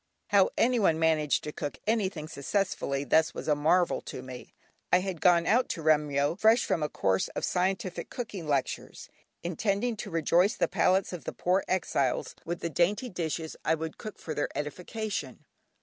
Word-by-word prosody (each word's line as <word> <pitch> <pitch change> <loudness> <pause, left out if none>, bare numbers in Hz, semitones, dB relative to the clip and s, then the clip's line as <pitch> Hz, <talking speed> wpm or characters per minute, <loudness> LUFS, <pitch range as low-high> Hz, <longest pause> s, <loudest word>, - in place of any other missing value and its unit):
How 200 -2 +5
anyone 230 -9 +3
managed 160 -2 +2
to 150 - -4
cook 145 -1 -5
anything 195 -8 0
successfully 140 -3 -1
thus 160 +4 +2
was - - -6
a 150 - +4
marvel 165 +5 +2
to 130 - -7
me. 130 -1 -10 0.4
I 180 - +5
had 185 -4 -4
gone 175 -2 +5
out 240 +8 +3
to 165 - -4
Remyo, 150 -1 +2
fresh 225 +3 +5
from 160 - 0
a 150 - 0
course 95 -1 +1
of - - -1
scientific 185 0 -1
cooking 210 - -6
lectures, 140 -3 -2 0.3
intending 200 +7 0
to - - -6
rejoice 170 +5 +2
the - - +1
palates 185 +1 +2
of 175 - -7
the - - -4
poor 185 +2 +1
exiles 140 -8 0
with 170 +1 -4
the 170 - -2
dainty 200 - +1
dishes 165 -3 -3
I 160 - +2
would 160 0 -6
cook 215 - -7
for 160 - -5
their 145 - -1
edification. 185 +8 -4
170 Hz, 175 wpm, -29 LUFS, 150-195 Hz, 0.4 s, How